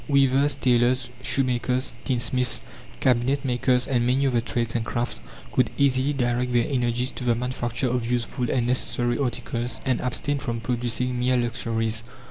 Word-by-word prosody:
Weavers, 140 0 +3
tailors, 125 -1 +2
shoemakers, 130 0 +1
tinsmiths, 125 -2 0 0.4
cabinet 130 +2 +2
makers, 125 0 +2
and 125 -3 +1
many 130 +3 +2
other 125 -3 +2
trades 115 0 -2
and 115 - 0
crafts 120 - -2 0.3
could - - +2
easily 135 0 +3
direct 125 -2 0
their 120 -1 +3
energies 125 -1 0
to - - -7
the 120 -1 +2
manufacture 125 +1 -2
of 120 -1 -1
useful 120 0 -1
and 125 -3 +1
necessary 120 0 0
articles, 120 -2 -2
and 130 -2 +1
abstain 140 +3 -1
from 120 -3 -3
producing 125 +1 -1
mere 125 +1 +2
luxuries. 115 -2 -1
125 Hz, 150 wpm, -25 LUFS, 120-130 Hz, 0.4 s, Weavers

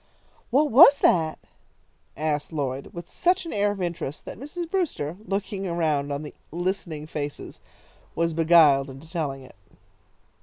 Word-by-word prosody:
"What 290 +4 +2
was 280 +3 +9
that?" 160 -3 +3 0.8
asked 150 0 -2
Lloyd, 140 -3 -3
with 170 0 -8
such 360 0 +1
an 330 - -5
air 205 0 +2
of 205 -1 -4
interest, 170 -5 -4
that - - -8
Mrs. 330 +6 -6
Brewster, 320 - -2
looking 195 0 -3
around 155 -5 0
on 140 +1 -3
the 150 - -8 0.2
listening 175 -3 -3
faces, 145 -2 -6 0.6
was 165 0 0
beguiled 155 -4 +5
into 135 +4 -11
telling 145 -5 -4
it. 130 - -15
165 Hz, 145 wpm, -25 LUFS, 145-200 Hz, 0.8 s, was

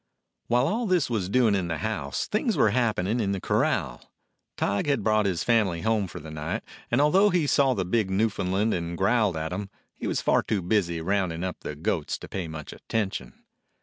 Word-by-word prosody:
While 120 +2 +3
all 230 +2 -1
this 180 -9 +2
was 100 -5 -1
doing 115 -1 +3
in 95 -3 0
the 85 -2 -2
house, 110 +7 -2
things 220 +2 0
were 105 - +4
happening 115 -2 +1
in 100 -3 0
the 95 - -2
corral. 65 -7 -1 0.5
Tige 100 +7 0
had 140 -7 +1
brought 110 -1 +3
his 90 -3 -1
family 105 -8 +2
home 110 -2 +1
for - - -8
the 80 +1 -9
night, 75 +1 -4 0.3
and 120 - +2
although 185 +8 +5
he 175 -5 +2
saw 135 -2 +3
the 95 - -1
big 100 +2 +1
Newfoundland 100 0 +1
and 85 -1 -3
growled 100 -2 +2
at 80 +2 -3
him, 100 +1 -4 0.2
he - - -5
was - - 0
far - - +3
too 100 -5 -2
busy 85 -3 0
rounding 90 -2 -1
up 95 -2 -3
the 75 - -6
goats 75 - -2
to - - -10
pay 95 -3 -4
much 80 -1 -7
attention. 100 - -4
100 Hz, 205 wpm, -26 LUFS, 90-115 Hz, 0.5 s, although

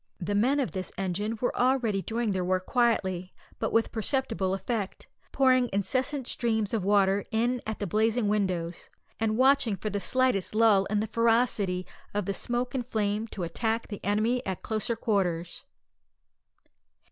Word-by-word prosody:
The 200 +2 -2
men 250 +8 +3
of 265 - -1
this 185 -2 -4
engine 195 +4 -2
were 245 - -1
already 245 -6 +2
doing 225 +1 -1
their 185 -2 -1
work 185 +1 0
quietly, 190 -7 0 0.2
but - - -1
with 225 0 +2
perceptible 220 -5 -1
effect, 205 -1 -4 0.2
pouring 255 -2 +3
incessant 255 +8 -1
streams 220 -3 0
of 220 -4 0
water 200 0 +3
in 240 +2 0
at 220 - -3
the 205 - -3
blazing 220 +4 +1
windows, 185 -5 -1 0.3
and 220 -1 0
watching 265 -4 +4
for 210 +3 -4
the 205 - -1
slightest 250 -4 +1
lull 215 -3 +5
in 210 +1 0
the - - 0
ferocity 225 -5 +1 0.3
of 205 - 0
the 200 - -1
smoke 245 +5 -2
and 250 -3 -3
flame 215 -1 -1
to 195 -4 -6
attack 225 +7 -2
the 205 - -7
enemy 220 +5 +1
at 190 -2 -4
closer 220 +1 -1
quarters. 185 -7 -1
215 Hz, 160 wpm, -28 LUFS, 195-240 Hz, 0.3 s, lull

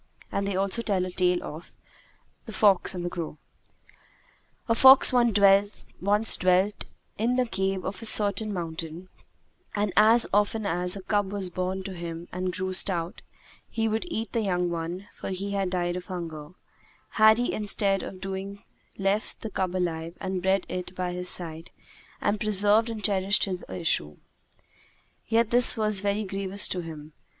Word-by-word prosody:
And 200 0 -2
they 200 - -2
also 195 +4 0
tell 195 -5 -1
a 185 - -6
tale 180 -1 +1
of 155 +3 -9 0.8
THE - - -7
FOX 195 -2 +3
AND 175 -1 -4
THE - - -2
CROW 165 -3 -6 1.3
A 230 - +3
Fox 265 +3 +7
once 240 -4 +3 1.0
dwelt 185 +3 +1 0.3
in 245 +3 +1
a 250 - +2
cave 190 -3 -2
of 190 0 -5
a - - -5
certain 210 0 +5
mountain 165 0 -6 0.7
and, 205 -2 -1
as 225 +3 +6
often 210 +1 +1
as 180 0 0
a 195 - -8
cub 205 -1 -1
was 195 -3 -3
born 185 +2 -3
to 195 0 -7
him 170 -1 -7
and 185 0 -3
grew 185 +1 -4
stout, 180 0 -1 0.5
he 225 -1 -1
would 220 +5 -2
eat 225 -9 -4
the 230 - -1
young 180 -4 -1
one, 170 +3 -5
for - - -7
he 195 +2 -4
had 195 -2 -1
died 175 -1 -2
of 180 0 -7
hunger, 165 -4 -7 0.6
had 220 0 +5
he 245 - -1
instead 200 -2 +1
of - - -7
so - - -14
doing 195 +1 -6 0.3
left 195 +2 -2
the 220 - -6
cub 185 -1 -2
alive 170 -2 -3
and 190 -2 -3
bred 190 +1 +1
it 180 0 -6
by 180 -1 -3
his 180 0 -2
side 165 -1 -2 0.5
and 210 - -1
preserved 210 +2 +3
and 220 -2 -6
cherished 195 0 +2
his 185 -2 -3
issue. 75 - -1 1.1
Yet 230 0 +1
was 245 0 +7
this 215 -2 +3
very 200 +2 -1
grievous 195 0 -2
to 185 - -2
him. 155 -2 -10
190 Hz, 170 wpm, -26 LUFS, 180-210 Hz, 1.3 s, Fox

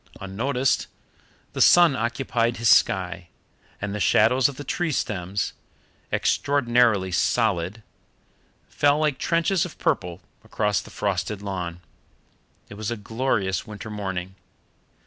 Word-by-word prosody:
Unnoticed, 125 +7 -1 0.7
the - - -2
sun 175 -5 +6
occupied 120 0 -1
his 115 +1 0
sky, 95 -2 +2 0.5
and 100 0 -4
the 105 - -3
shadows 120 +6 +4
of 140 - -8
the 145 - -7
tree 170 +4 -2
stems, 100 -6 -2 0.6
extraordinarily 120 -8 +2
solid, 105 +1 0 0.8
fell 145 0 +2
like 150 -3 0
trenches 170 +2 +1
of 180 - -7
purple 90 0 -1 0.2
across 105 -2 0
the - - -13
frosted 100 0 -3
lawn. 90 -3 -5 0.9
It - - -11
was 110 -1 -3
a 120 - -3
glorious 105 -3 -1
winter 105 0 -8
morning. 95 -3 -4
110 Hz, 120 wpm, -24 LUFS, 95-130 Hz, 0.9 s, sun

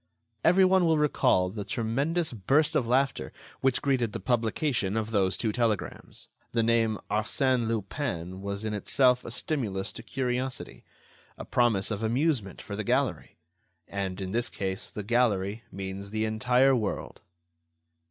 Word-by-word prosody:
Every 185 +3 +6
one 185 0 +4
will 160 -2 +3
recall 130 -10 +3
the 105 +2 -5
tremendous 140 - -1
burst 145 - +2
of 120 - +2
laughter 135 +3 +1 0.3
which 135 -1 +1
greeted 125 -6 +1
the - - -3
publication 115 - 0
of 110 0 -2
those 95 -3 +2
two 110 - 0
telegrams. 115 -4 -2 0.3
The 115 -1 +2
name 115 -1 +2
"Arsène 120 +3 +1
Lupin" 95 - -3
was 100 +2 -4
in 110 - -2
itself 125 +5 +3
a - - -7
stimulus 115 -6 -2
to - - -8
curiosity, 130 0 -3 0.5
a - - -7
promise 115 -5 +2
of 105 0 -2
amusement 120 - 0
for 100 - -6
the 110 - -3
gallery. - - -1 0.5
And, 95 -1 -3
in 95 -1 -4
this 120 +3 0
case, 95 -1 -3
the 105 - -6
gallery 110 -1 +1
means 95 +1 -6
the 110 +1 -1
entire 125 +5 +3
world. 110 -5 -3
115 Hz, 150 wpm, -28 LUFS, 100-130 Hz, 0.5 s, Every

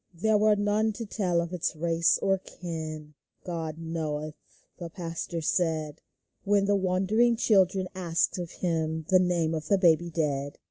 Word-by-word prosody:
There 215 +6 +2
were 215 0 +4
none 205 +2 +1
to 230 +2 -6
tell 185 -5 0
of 170 +1 -5
its 175 -2 -2
race 165 +1 +2
or 195 -1 +2
kin. 155 -4 -7 0.2
" - - -48
God 160 -3 -4
knoweth," 155 -2 -4 0.5
the 170 -2 -6
pastor 170 -1 -5
said, 160 -2 -1 0.4
When 200 -1 +2
the 205 0 +2
wondering 195 +5 +2
children 190 -4 +2
asked 175 -1 0
of 175 -2 -4
him 160 -3 -2
The 185 - +6
name 175 -3 +1
of 155 -1 -4
the 200 - +3
baby 175 -2 +3
dead. 145 -4 -2
170 Hz, 165 wpm, -28 LUFS, 160-195 Hz, 0.5 s, The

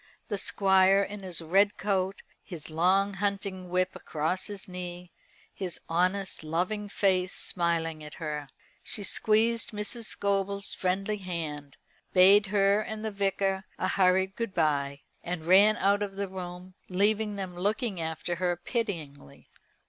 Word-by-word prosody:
The 205 - -1
Squire 190 0 +4
in 205 +1 -6
his 180 -3 -4
red 195 +5 +3
coat, 190 -1 -1 0.2
his 160 -3 -9
long 190 +5 +3
hunting 195 -2 -3
whip 185 +1 0
across 160 +4 -2
his 205 -2 -6
knee, 180 -1 -7 0.4
his 185 -3 -4
honest 185 +2 0
loving 185 +7 -2
face 185 -2 +1
smiling 165 -3 -1
at 150 - -9
her. 150 -3 -4 0.3
She 205 - -2
squeezed 225 +3 +2
Mrs. 215 +3 -4
Scobel's 200 -1 0
friendly 195 +3 -1
hand, 155 -7 -5 0.4
bade 195 +3 +7
her 200 +1 +3
and 220 0 -5
the 220 - -2
Vicar 195 -1 0
a - - -1
hurried 190 0 +3
good 230 -4 -4
bye, 140 -3 +1 0.2
and 170 -2 -4
ran 200 +5 +6
out 200 +1 +2
of 200 -1 -3
the 200 0 -2
room, 180 0 -8 0.2
leaving 210 +3 +1
them 190 -3 -5
looking 205 +1 -1
after 160 +2 -3
her 175 0 +1
pityingly. 170 - -5
190 Hz, 140 wpm, -29 LUFS, 175-200 Hz, 0.4 s, bade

